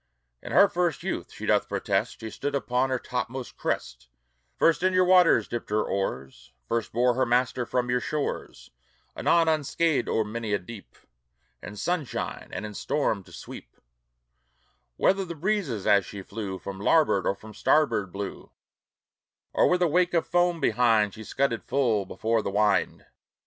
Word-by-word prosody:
In - - -8
her 200 - +7
first 175 -3 -1
youth, - - -4
she - - -8
doth - - +2
protest, - - -1
She 110 -1 -6
stood 145 0 -3
upon 130 -1 0
your 130 - 0
topmost 125 +1 -5
crest, - - -4 0.5
First 165 0 +3
in 185 0 +2
your 185 0 +4
waters 180 -1 +5
dipped 120 - -5
her 105 +1 +1
oars, 65 -9 -4
First 115 -2 -2
bore 125 +2 +2
her 130 +2 +1
master 125 0 +1
from 125 -1 -1
your 125 - +2
shores 150 +3 -4 0.4
Anon 170 -1 +3
unscathed 155 -2 +1
o'er 110 - +1
many 110 0 -4
a - - +3
deep, 100 +2 -12 0.6
In 105 - -8
sunshine 160 - -3
and 105 - -5
in 105 - -7
storm 110 -5 -1
to - - -17
sweep; - - -11 1.2
Whether 195 +1 +2
the 170 -2 -6
breezes, 160 - -1
as 100 -1 +5
she 100 +2 -8
flew, 100 -2 -5
From 95 0 -8
larboard 105 -2 +3
or 100 - +1
from 110 +2 -13
starboard 105 -9 +2
blew, 100 +1 -6 1.0
Or - - +4
with 180 0 +2
a - - +4
wake 175 +2 +2
of 165 - +2
foam 175 -1 +1
behind, 110 -5 +3
She 110 - -9
scudded 125 0 -1
full 120 -7 0
before 115 +3 0
the - - -3
wind. 105 +1 +1
125 Hz, 165 wpm, -26 LUFS, 105-160 Hz, 1.2 s, her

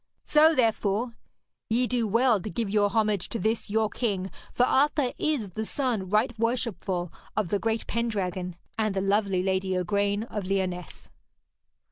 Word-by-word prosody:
So, 310 +1 +5
therefore, 225 -1 +1 0.5
ye 240 +3 +2
do 240 -2 0
well 230 0 +3
to 210 - -5
give 225 -2 -2
your 205 -1 +3
homage 210 -4 0
to - - -3
this 220 0 -1
your 220 +1 +2
king, 200 -4 -2 0.2
for 245 - +3
Arthur 280 -1 +2
is 285 -10 0
the 215 +5 -3
son 225 -6 -1
right 215 +5 +2
worshipful 215 -7 -1 0.2
of 210 -5 0
the 205 - +1
great 225 +1 -1
Pendragon, 185 -6 -2 0.2
and 215 -2 +1
the 190 - +1
lovely 195 -2 +1
lady, 190 0 0
Igraine 200 +3 0
of 210 -3 -5
Lyonesse.' 185 -3 -3
215 Hz, 155 wpm, -27 LUFS, 195-235 Hz, 0.5 s, So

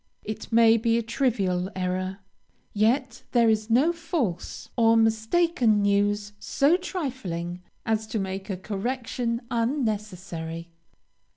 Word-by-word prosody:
It 215 +2 -6
may 230 0 +6
be 230 0 +2
a 235 - 0
trivial 200 -7 0
error, 185 +1 -2 0.5
yet 240 +4 +1
there 235 -2 +5
is 215 0 -1
no 270 +9 +4
false 315 - -3
or 230 -1 +5
mistaken 225 - +3
news 205 +1 +1
so 285 +5 +3
trifling 240 - -4 0.2
as 220 -1 0
to 220 - -3
make 190 0 -4
a 190 - -2
correction 230 +4 -2
unnecessary. 200 - -2
220 Hz, 115 wpm, -26 LUFS, 195-240 Hz, 0.5 s, may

